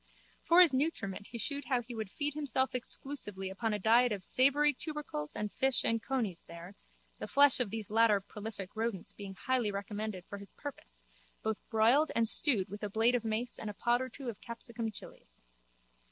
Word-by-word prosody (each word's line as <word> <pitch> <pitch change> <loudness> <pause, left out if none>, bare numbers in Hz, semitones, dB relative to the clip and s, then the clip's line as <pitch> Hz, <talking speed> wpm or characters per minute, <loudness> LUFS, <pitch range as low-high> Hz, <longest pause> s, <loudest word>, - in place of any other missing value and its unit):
For 345 +2 +6
his 335 -6 +6
nutriment 235 - -1
he 235 - -7
shewed 280 +4 -3
how 250 -1 +1
he 240 +1 -8
would 220 -3 -4
feed 295 +6 -3
himself 265 -3 0
exclusively 240 -6 -3
upon 220 +4 -1
a 210 - 0
diet 230 +4 +4
of 200 -3 -3
savoury 285 +7 +4
tubercles 285 - -5
and 210 -1 -3
fish 265 -1 +2
and 230 0 +1
coneys 225 -10 -2
there, 170 +3 -10 0.5
the - - -4
flesh 280 -2 +5
of 245 -5 +1
these 215 -1 -5
latter 225 -2 +5
prolific 205 0 -8
rodents 220 -4 -2
being 195 -2 -8
highly 245 +1 0
recommended 200 -1 -4
for 200 - -7
his 200 - -12
purpose, - - -9 0.4
both 220 -1 -1
broiled 235 +8 +4
and 230 -1 +3
stewed 220 -6 +2
with 205 +2 -8
a 210 - -2
blade 225 +4 +3
of 245 -2 +1
mace 225 +2 -2
and 215 - -4
a 205 - -7
pod 240 +3 +2
or 260 - -3
two 265 +2 -9
of 230 -4 -5
capsicum 235 -1 -4
chillies. 205 - -12
225 Hz, 195 wpm, -33 LUFS, 205-260 Hz, 0.5 s, For